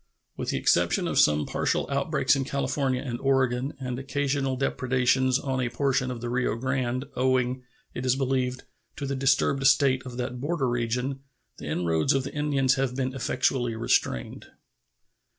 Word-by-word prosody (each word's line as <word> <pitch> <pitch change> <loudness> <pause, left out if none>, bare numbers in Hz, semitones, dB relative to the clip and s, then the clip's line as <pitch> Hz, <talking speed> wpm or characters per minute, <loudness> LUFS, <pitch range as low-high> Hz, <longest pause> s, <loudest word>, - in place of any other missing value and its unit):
With - - -4
the - - 0
exception - - +2
of - - +1
some 75 0 +4
partial - - 0
outbreaks - - +2
in 135 - -1
California 135 -1 -1
and 120 -4 -4
Oregon 135 0 +1
and 125 -1 -4
occasional 135 -1 -1
depredations 130 -1 +1
on 135 -2 -2
a 125 - 0
portion 130 +1 0
of 125 -2 -5
the 120 - -3
Rio 125 -1 0
Grande, 130 +1 -2
owing, 130 0 +1 0.3
it 125 - -5
is 130 0 +2
believed, 130 -1 -1 0.3
to 140 - -5
the 140 0 -2
disturbed 135 0 +2
state 135 -1 +4
of 125 -2 -8
that 125 0 -4
border 145 -2 0
region, 120 +3 -1 0.4
the - - -7
inroads 80 -3 +1
of 135 -1 +1
the 140 - -7
Indians 140 -3 +2
have 130 -2 -1
been 130 -1 -2
effectually 120 -2 0
restrained. 110 - -1
130 Hz, 165 wpm, -26 LUFS, 125-135 Hz, 0.4 s, some